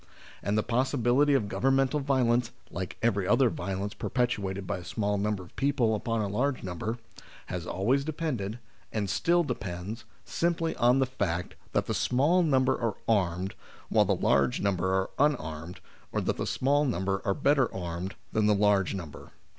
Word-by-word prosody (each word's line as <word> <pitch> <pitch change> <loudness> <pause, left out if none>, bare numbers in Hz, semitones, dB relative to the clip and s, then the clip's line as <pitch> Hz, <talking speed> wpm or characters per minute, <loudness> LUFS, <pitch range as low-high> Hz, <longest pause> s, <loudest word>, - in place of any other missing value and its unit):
And 100 +2 0
the 110 - +2
possibility 130 +3 +2
of 110 -6 +1
governmental 135 +5 +2
violence, 125 -4 +2 0.2
like 95 -1 -5
every 100 -5 +2
other 125 +3 +4
violence 95 +3 -3
perpetrated 100 -6 -1
by 90 - -2
a - - -10
small 105 +2 -1
number 105 -2 -1
of 85 - -17
people 135 -5 +2
upon 115 +1 -1
a - - -1
larger 125 +4 -1
number, 100 +6 -3 0.5
has 90 -1 -5
always 125 +9 +1
depended, 140 -9 -3 0.3
and 100 -3 -1
still 175 +1 +3
depends, 100 - -5 0.2
simply 165 -1 0
on 120 +2 +4
the 135 - +3
fact 95 -9 -2 0.2
that - - +1
the - - -2
small 150 +9 +3
number 135 -5 +3
are 115 -4 0
armed, 95 -3 +1 0.4
while - - +4
the - - +2
large 70 -2 +2
number 95 -2 0
are 95 0 0
unarmed, 85 - -1 0.3
or - - 0
that - - -1
the - - -2
small 145 +3 +2
number 95 -7 -1
are 100 - 0
better 140 -3 +3
armed 90 +1 -5 0.2
than 110 -1 +2
the 105 - +4
large 100 -2 +2
number. 85 -6 -8
110 Hz, 170 wpm, -28 LUFS, 95-135 Hz, 0.5 s, other